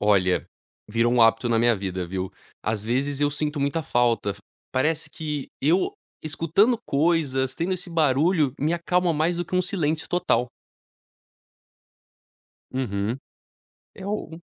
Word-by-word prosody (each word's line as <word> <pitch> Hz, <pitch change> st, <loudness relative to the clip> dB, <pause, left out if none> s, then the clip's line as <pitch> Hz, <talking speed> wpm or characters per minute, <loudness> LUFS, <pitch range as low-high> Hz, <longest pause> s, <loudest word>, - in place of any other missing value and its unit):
Olha, 95 Hz, -3 st, +3 dB, 0.4 s
virou 115 Hz, +2 st, +2 dB
um 125 Hz, -1 st, +5 dB
hábito 115 Hz, +1 st, +4 dB
na 115 Hz, -1 st, +3 dB
minha 120 Hz, 0 st, +4 dB
vida 95 Hz, -2 st, -3 dB
viu. 95 Hz, +1 st, -3 dB, 0.3 s
As 110 Hz, -1 st, -1 dB
vezes 135 Hz, +5 st, -1 dB
eu 145 Hz, 0 st, +3 dB
sinto 150 Hz, 0 st, -2 dB
muita 140 Hz, +4 st, 0 dB
falta 120 Hz, -6 st, +1 dB
f 100 Hz, -, -7 dB, 0.3 s
parece 155 Hz, +5 st, 0 dB
que 150 Hz, -3 st, -4 dB
eu 175 Hz, -, +2 dB, 0.3 s
escutando 170 Hz, +9 st, +2 dB
coisas, 140 Hz, -4 st, +1 dB
tendo 170 Hz, +6 st, -1 dB
esse 180 Hz, -1 st, -6 dB
barulho 155 Hz, -1 st, +3 dB
me 155 Hz, +4 st, +1 dB
acalma 175 Hz, +1 st, +1 dB
mais 160 Hz, +3 st, +1 dB
do 175 Hz, -, -2 dB
que 175 Hz, -, -6 dB
um 180 Hz, -, +3 dB
silêncio 160 Hz, -4 st, -1 dB
total. 125 Hz, -9 st, +1 dB, 2.2 s
Uhum, 110 Hz, -3 st, -1 dB, 0.8 s
é 190 Hz, -, -9 dB
o 170 Hz, -5 st, -4 dB
145 Hz, 140 wpm, -25 LUFS, 115-165 Hz, 2.2 s, um